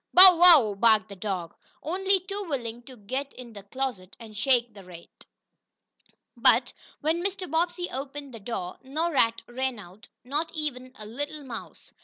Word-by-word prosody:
"Bow 365 0 +10
wow!" 330 - +7
barked 215 +1 +3
the 200 - -9
dog, 185 -4 -4 0.3
only 385 +5 +1
too 395 +3 -6
willing 240 -4 -4
to 255 +1 -14
get 260 +7 -5
in 245 -2 -11
the 205 - -10
closet 200 -3 -5
and 220 -2 -12
shake 240 +1 +1
the 200 -1 -13
rat. 175 -2 -14 1.1
But, - - +4 0.3
when 325 +3 0
Mr. 380 -1 -3
Bobbsey 345 +2 -1
opened 275 0 -7
the 230 - -9
door, 195 -4 -6
no 310 +6 -2
rat 230 -5 +2
ran 260 0 -3
out, 195 0 -14 0.2
not 295 +6 -3
even 255 -5 -4
a 215 - -9
little 290 +7 -6
mouse. 240 -4 -10
255 Hz, 165 wpm, -26 LUFS, 215-310 Hz, 1.1 s, Bow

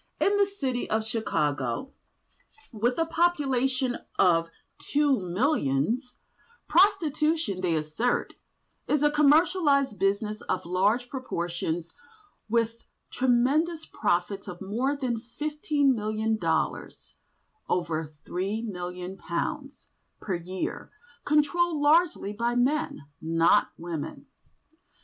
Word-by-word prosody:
In 405 - +3
this 400 0 0
city 255 -3 -1
of 220 0 0
Chicago 150 - -1 0.8
(with 240 +2 0
a 330 - +2
population 270 -7 +1 0.2
of 165 -2 +4 0.3
two 290 -2 +2
millions) 195 - 0 0.5
prostitution, 320 - +2
they 175 -3 +1
assert, 155 +11 -1 0.5
is 300 -1 +2
a 295 - +4
"Commercialised 295 - +3
Business 210 +2 0
of 185 - -1
large 200 +8 +1
proportions 175 - -3 0.6
with 230 0 +1 0.3
tremendous 275 +7 +2
profits 180 +4 -1
of 180 -2 -7
more 240 +9 -1
than 250 -5 -2
fifteen 290 +3 0
million 215 0 -1
dollars 220 - -2 0.6
(over 160 -3 -1
£3,000,000) 190 - -4 0.3
per 195 - -3
year, 180 +2 -4 0.4
controlled 305 +2 +2
largely 295 - +3
by 235 +3 -1
men, 270 - +1 0.2
not 165 +1 +3
women. 165 -3 -6
240 Hz, 95 wpm, -27 LUFS, 185-295 Hz, 0.8 s, of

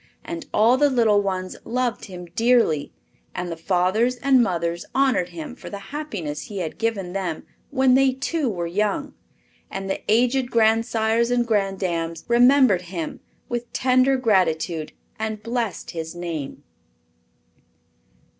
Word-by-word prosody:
And 335 -1 -6
all 230 +4 +4
the 290 +1 +4
little 225 -6 +3
ones 185 -2 -3
loved 245 0 -2
him 180 -3 -9
dearly; 230 -11 +3 0.4
and 180 -1 -3
the - - -3
fathers 190 +8 +1
and 260 0 +4
mothers 170 -5 -1
honored 260 -10 +2
him 305 -6 -7
for - - -10
the 200 - -6 0.2
happiness 190 - -4
he 205 - -8
had 170 -1 -4
given 205 -6 -2
them 185 -5 -3 0.3
when 265 -2 +3
they 265 0 +4
too 275 +1 -1
were 175 -5 -3
young; 200 +4 -1 0.6
and 195 0 -5
the 195 - -2
aged 245 +3 +2
grandsires 225 0 +2
and 245 -1 +2
granddames 185 -6 -1
remembered 245 -4 +5
him 170 -4 -5 0.3
with 240 0 -4
tender 255 +1 +3
gratitude 170 -8 +1 0.3
and 220 -1 -3
blessed 230 -3 -3
his 160 0 -6
name. 165 -5 -5
220 Hz, 135 wpm, -23 LUFS, 180-250 Hz, 0.6 s, remembered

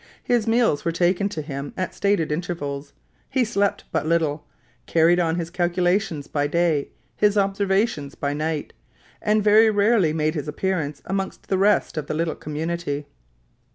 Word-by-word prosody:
His 240 -3 +1
meals 225 -9 +2
were 170 - 0
taken 180 +4 +1
to 160 -6 -5
him 140 -1 -6
at 185 - -2
stated 200 -6 +1
intervals; 150 -4 -4 0.4
he 260 -2 +2
slept 200 -3 0
but - - -1
little; 160 -3 0 0.4
carried 170 +2 +4
on 165 -2 +1
his 170 -1 -4
calculations 175 -2 0
by 145 -1 -1
day, 165 -2 +1 0.3
his 210 0 +2
observations 195 -5 0
by 140 0 -2
night, 155 0 -3 0.5
and 210 0 +2
very 215 +2 +6
rarely 205 -4 +3
made 155 0 0
his 150 -2 -4
appearance 160 -3 -2
amongst 195 0 -4
the 190 - +2
rest 205 -4 +2
of 150 - -3
the - - -2
little 165 0 0
community. 155 -1 -4
170 Hz, 155 wpm, -23 LUFS, 150-200 Hz, 0.5 s, very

